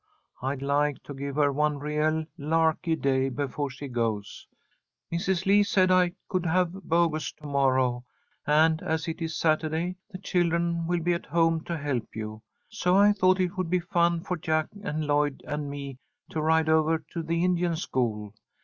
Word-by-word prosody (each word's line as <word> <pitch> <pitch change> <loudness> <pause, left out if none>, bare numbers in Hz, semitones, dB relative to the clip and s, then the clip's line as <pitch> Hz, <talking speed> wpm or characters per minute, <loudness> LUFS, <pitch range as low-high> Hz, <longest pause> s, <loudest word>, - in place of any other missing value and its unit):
I'd 135 +1 -3
like 145 0 0
to 145 - -8
give 140 0 -5
her 145 -1 +3
one 150 +1 +1
real 150 +2 0
larky 160 +1 +1
day 135 -3 +1
before 145 +1 -3
she 135 +2 -8
goes. 115 -5 -3 0.7
Mrs. 180 +2 0
Lee 200 +1 +5
said 190 -2 +3
that 185 - +5
I 180 -1 +3
could 185 -2 -1
have 180 +1 +2
Bogus 170 -4 0
to 150 - -16
morrow, 130 -3 +1 0.4
and, 155 +2 +4
as 160 0 -2
it 165 +1 -4
is 160 -1 -3
Saturday, 160 +3 0
the 190 - -7
children 170 -2 0
will 175 0 0
be 175 +2 +1
at 170 - -4
home 165 0 +2
to 170 - -3
help 140 -6 -3
you. 110 0 -6 0.3
So 185 -5 0
I 205 +1 +6
thought 185 -1 +3
it 185 +1 -1
would 185 -3 -1
be 180 +1 +2
fun 170 -1 +1
for 180 +1 -3
Jack 155 0 0
and 155 -6 -3
Lloyd 145 -1 0
and 150 -1 -3
me 140 -2 -7 0.3
to 155 - -2
ride 160 +1 +3
over 160 0 +3 0.2
to 170 - -2
the 165 +1 -1
Indian 175 -2 +1
school. 110 - -2
160 Hz, 180 wpm, -27 LUFS, 145-170 Hz, 0.7 s, I